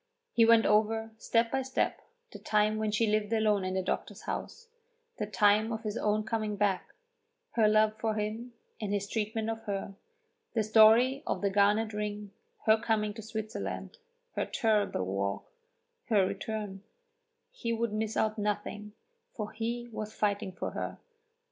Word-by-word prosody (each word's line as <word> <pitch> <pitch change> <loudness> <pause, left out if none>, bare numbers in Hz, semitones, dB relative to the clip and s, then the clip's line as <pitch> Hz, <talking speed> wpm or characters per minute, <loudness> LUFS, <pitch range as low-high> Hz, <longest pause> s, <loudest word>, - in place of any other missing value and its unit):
He 230 - +5
went 230 0 +6
over, 220 +1 +2
step 230 0 +2
by 270 - +1
step, 265 0 -1 0.3
the - - -9
time 215 0 +2
when 215 0 0
she 215 +2 +2
lived 215 0 0
alone 215 -3 +2
in 185 0 -2
the 190 - 0
doctor's - - -3
house, 470 - -5 0.5
the - - -1
time 210 +1 +3
of 220 0 -4
his 210 -1 -3
own 215 -1 +1
coming 215 -1 -2
back, 200 -2 0 0.6
her 225 -2 +3
love 215 0 +4
for 220 -1 0
him 220 +3 -3 0.3
and 205 -2 -2
his 200 0 -1
treatment 220 +1 -2
of 225 0 -3
her, 195 -1 -3 0.6
the 220 - +3
story 225 +5 +6
of - - -1
the 200 - +2
garnet 210 +2 +3
ring, 210 -1 -4 0.3
her 220 0 +5
coming 215 -2 0
to 220 - -8
Switzerland, 220 - -5 0.4
her - - -1
terrible 210 - +1
walk, 100 +1 -2 0.6
her 205 -5 +3
return; 200 0 -4 0.7
he 240 - -3
would 230 -1 -1
miss 215 0 -2
out 215 0 +1
nothing, 210 0 -3 0.4
for 215 -2 -4
he 235 +2 -3
was 215 -1 -6
fighting 200 -2 0
for 180 - -4
her. - - -4
215 Hz, 160 wpm, -30 LUFS, 210-225 Hz, 0.7 s, went